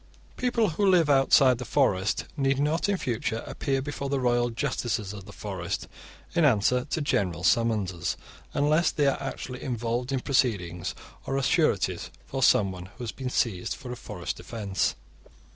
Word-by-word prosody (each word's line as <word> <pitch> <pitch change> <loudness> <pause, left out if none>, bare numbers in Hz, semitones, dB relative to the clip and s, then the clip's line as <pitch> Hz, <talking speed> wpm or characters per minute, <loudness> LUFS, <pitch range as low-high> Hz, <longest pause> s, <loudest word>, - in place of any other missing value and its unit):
(44) - - -27
People 240 -4 +1
who 195 +5 +2
live 165 -5 +4
outside 135 -2 +5
the - - -3
forest 105 -9 +1
need 135 -2 +1
not 150 +7 +1
in 200 - +2
future 115 -5 -2
appear 135 -1 -1
before 140 -1 -4
the 140 -1 0
royal 120 -1 +2
justices 115 -4 -2
of 100 -2 -9
the - - -11
forest - - -4 0.5
in 170 - +3
answer 125 -1 +3
to 155 +2 -2
general 90 - 0
summonses, 95 -5 +1 0.4
unless 150 +4 +3
they 145 - +1
are 140 0 +1
actually 130 -2 -5
involved 120 0 -2
in 135 - +1
proceedings 100 - 0 0.3
or 135 - 0
are 135 - 0
sureties - - +1 0.2
for - - -4
someone 95 -3 +3
who 110 +6 -10
has 115 - -3
been 130 -2 -5
seized 105 -7 0
for 125 - -8
a - - -4
forest 90 -7 -6
offence. 100 +1 -1
125 Hz, 170 wpm, -27 LUFS, 105-140 Hz, 0.5 s, outside